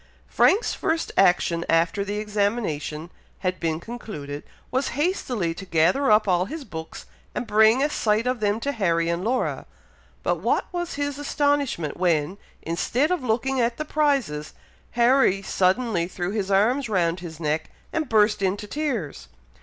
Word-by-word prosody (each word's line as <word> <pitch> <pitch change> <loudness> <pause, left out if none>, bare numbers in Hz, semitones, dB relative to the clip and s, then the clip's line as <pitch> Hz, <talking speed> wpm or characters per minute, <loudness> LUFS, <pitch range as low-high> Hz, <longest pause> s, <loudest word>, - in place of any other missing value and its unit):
Frank's 425 - +3
first 325 0 -1
action, 175 -2 +3
after 165 +5 +2
the 205 +1 -4
examination 200 -7 -2 0.3
had 185 -1 -1
been 160 -2 -1
concluded, 170 -10 -7 0.3
was 260 +1 0
hastily 250 - 0
to 185 - -9
gather 180 - +2
up 210 0 +5
all 180 -1 +2
his 305 +8 -6
books, 160 -8 -8 0.3
and - - -2
bring 220 +4 +4
a 295 - +2
sight 215 -2 +1
of 250 -1 0
them 210 +1 +1
to 280 - -1
Harry 170 -8 +1
and 170 +1 -1
Laura; 250 +4 -1 0.6
but - - +1
what - - 0
was 350 -1 -3
his 285 0 -3
astonishment 285 - 0
when, 175 +1 +1 0.2
instead 240 - 0
of 360 -7 0
looking 250 +3 0
at 235 0 0
the 305 - -3
prizes, 275 - 0 0.4
Harry 240 -5 +4
suddenly 190 -1 +1
threw 180 0 -4
his 200 -2 -2
arms 225 +7 +2
round 175 -3 +1
his 165 -3 -9
neck, 155 0 -1 0.2
and 315 -4 -1
burst 210 -2 +3
into 195 +2 -1
tears. 235 - -3
210 Hz, 155 wpm, -24 LUFS, 170-255 Hz, 0.6 s, up